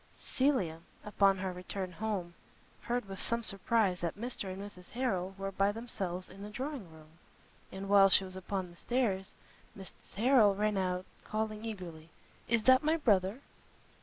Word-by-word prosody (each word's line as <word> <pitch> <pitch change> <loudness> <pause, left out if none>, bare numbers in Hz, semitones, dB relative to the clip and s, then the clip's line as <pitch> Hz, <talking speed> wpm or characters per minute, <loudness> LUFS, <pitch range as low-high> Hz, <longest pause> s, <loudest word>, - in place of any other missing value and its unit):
Cecilia, 255 - +1 0.3
upon 200 -2 +4
her 185 0 -3
return 185 +1 -4
home, 185 -2 -3 0.5
heard 240 -3 -2
with 195 -1 -7
some 235 0 0
surprise 195 -2 +1
that 170 +2 -2
Mr 225 -4 -3
and 185 - -6
Mrs 195 -3 -9
Harrel 195 -7 -1
were 195 0 -3
by 195 +1 +2
themselves 195 -5 -4
in 195 +1 -12
the 205 - -6
drawing 255 - -5
room; 160 +1 -17 0.5
and, 190 +1 -6
while 195 -1 +7
she 190 - +5
was 185 -1 -6
upon 190 -1 -3
the - - -16
stairs, 205 -6 0 0.5
Mrs 190 -1 -12
Harrel 220 -2 +5
ran 210 +1 +1
out, 185 -1 0 0.2
calling 215 0 -3
eagerly, 175 -7 -7 0.4
"Is 230 -1 +2
that 260 +1 +7
my 315 +2 +3
brother?" 205 - +2
195 Hz, 165 wpm, -33 LUFS, 185-225 Hz, 0.5 s, while